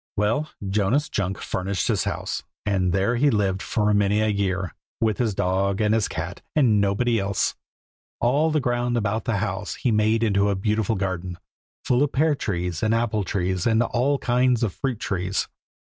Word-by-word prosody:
Well, 115 +10 +1 0.2
Jonas 105 +9 +1
Junk 100 -1 -2
furnished 95 0 -2
his - - +1
house, - - -3 0.2
and 95 -3 +1
there 100 +6 +1
he 145 +4 +4
lived 100 -5 0
for 105 -1 +1
many 105 0 +2
a 110 - +2
year, 95 -2 -1 0.3
with 110 -2 0
his 110 -5 0
dog 95 +2 0
and 105 0 +2
his 110 -2 +2
cat, 85 +2 -5
and 115 -9 +4
nobody 110 +4 +1
else. 100 0 0 0.7
All 140 +7 +2
the 155 -1 +1
ground 120 -2 0
about 110 0 -1
the 115 -4 0
house 95 +1 -3
he 125 - 0
made 110 +1 +2
into 100 -2 +2
a 100 - +1
beautiful 105 +2 0
garden, 95 -2 -3 0.5
full 125 +1 +2
of 145 - +1
pear 155 +3 +3
trees 90 - -3
and 110 +1 +2
apple 115 -2 0
trees 95 0 -1
and 115 +1 +3
all 125 +5 +1
kinds 125 -2 +2
of 105 -6 0
fruit 130 -6 -3
trees. 95 0 -1
105 Hz, 180 wpm, -24 LUFS, 95-120 Hz, 0.7 s, he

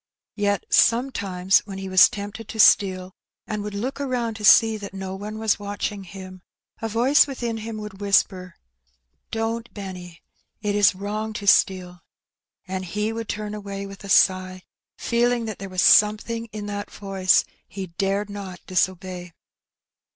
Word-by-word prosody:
Yet 205 -2 -1
sometimes 200 -7 +3
when 195 -1 -7
he 195 0 -6
was 185 0 +7
tempted 205 0 -7
to 220 - -8
steal, 185 -3 +4 0.3
and 210 -1 -4
would 205 0 -6
look 255 +7 -4
around 250 -4 -2
to 210 - -9
see 225 +2 +6
that 200 -2 -9
no 190 -1 -5
one 210 +2 -7
was 220 -1 0
watching 205 -1 -4
him, 185 0 -10 0.4
a 225 - -2
voice 250 +7 +4
within 240 -4 -4
him 220 0 -6
would 210 -2 -8
whisper, 190 -2 +1 0.7
''Don*t, 225 +1 -3
Benny, 180 -4 -9 0.4
it 205 -1 -2
is 205 -2 +4
wrong 210 +3 -4
to 205 - -6
steal,'' 180 -3 +2 0.7
and 185 0 -4
he 210 +4 -2
would 225 -1 -6
turn 210 0 -4
away 200 -1 -6
with 195 0 -11
a 200 - -9
sigh, 185 -1 +3 0.3
feeling 240 0 +1
that 215 -3 -6
there 195 0 -7
was 185 -1 0
something 215 +2 +4
in 215 -2 -8
that 205 0 -5
voice 195 -2 +1 0.2
he 195 -1 -6
dared 200 +1 0
not 200 -3 -8
disobey. 185 -1 -2
205 Hz, 160 wpm, -23 LUFS, 190-220 Hz, 0.7 s, was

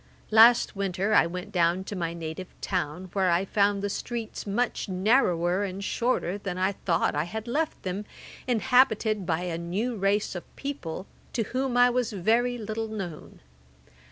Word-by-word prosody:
Last 225 +1 +6
winter 195 +1 -1
I 170 - +5
went 180 +1 -6
down 175 +1 +2
to 205 - -6
my 170 -2 -2
native 165 +2 -6
town, 180 0 -3
where 190 -2 +2
I 175 +3 +2
found 200 0 +1
the - - +1
streets 230 -2 -5
much 225 +1 -1
narrower 185 -2 +2
and 195 0 -4
shorter 205 -4 0
than 195 -3 -4
I 185 +1 +2
thought 185 -3 0
I 150 +2 0
had 220 +5 -6
left 305 +6 -1
them, 190 +3 -3 0.4
inhabited 220 -3 +3
by 160 0 0
a 175 -2 -3
new 200 +9 -2
race 200 +1 +1
of 175 - -9
people, 200 - -5 0.3
to 230 - 0
whom 255 +2 -2
I 245 0 +6
was 245 -2 -1
very 230 +6 +1
little 220 0 -4
known. 195 -8 -7
200 Hz, 165 wpm, -27 LUFS, 180-225 Hz, 0.4 s, Last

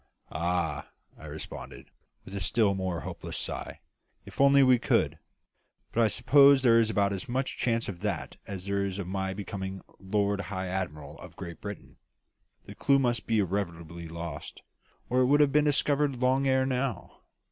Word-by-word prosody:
"Ah!" 80 -3 -1 0.3
I 80 - -12
responded, 75 +1 -9 0.3
with 95 - -10
a 100 - -3
still 105 +2 +2
more 95 -4 -2
hopeless - - -6
sigh, - - -4 0.4
"if - - -5
only 140 0 +6
we 130 -2 +5
could! - - +1 0.7
But 115 - +1
I 115 - +5
suppose 140 +5 +5
there 115 -2 +6
is 115 -1 +2
about 100 -2 +1
as 95 +2 -5
much 130 +2 -1
chance 115 -2 0
of 90 -4 -6
that 105 +1 -3
as 95 -2 -5
there 100 0 0
is 100 -1 -3
of 100 - -4
my 95 +1 -3
becoming 95 -1 -5 0.2
Lord 100 +1 0
High 95 0 -4
Admiral 75 -6 -5
of - - -12
Great 85 -2 -8
Britain. 100 -1 -8 0.7
The - - -10
clue 140 -1 +3
must 120 -3 0
be 115 - +2
irretrievably 85 -4 -3
lost, 85 0 -7 0.4
or 125 - +1
it 130 - +4
would 145 +2 +4
have 145 -2 +5
been 150 +1 +3
discovered 145 -1 +2
long 130 +2 +2
ere 130 0 +3
now. 130 -5 -3
100 Hz, 175 wpm, -28 LUFS, 90-130 Hz, 0.7 s, only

